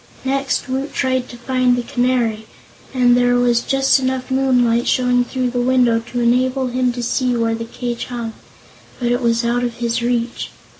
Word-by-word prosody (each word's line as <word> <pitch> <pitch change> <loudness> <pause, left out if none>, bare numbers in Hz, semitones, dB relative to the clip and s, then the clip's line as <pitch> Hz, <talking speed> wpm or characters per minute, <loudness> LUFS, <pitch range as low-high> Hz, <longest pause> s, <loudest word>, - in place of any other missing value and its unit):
Next, 275 +1 -1
Woot 265 +2 -3
tried 260 -1 0
to 240 - -10
find 255 0 +1
the 245 - -2
Canary, 240 -3 0 0.4
and 245 -2 +3
there 245 0 +3
was 240 -1 +2
just 270 0 +2
enough 260 0 -2
moonlight 250 -3 +2
showing 250 -1 +2
through 250 0 -2
the 245 0 -1
window 245 -2 +3
to 235 +2 -6
enable 255 +2 +1
him 250 0 0
to 245 0 -5
see 250 +1 0
where 230 -1 0
the 230 0 -4
cage 240 0 -5
hung; 235 -2 -5 0.7
but 240 -1 0
it 245 +1 0
was 235 0 +1
out 240 +1 0
of 240 -1 -2
his 235 0 -2
reach. 240 0 -2
245 Hz, 185 wpm, -19 LUFS, 235-255 Hz, 0.7 s, and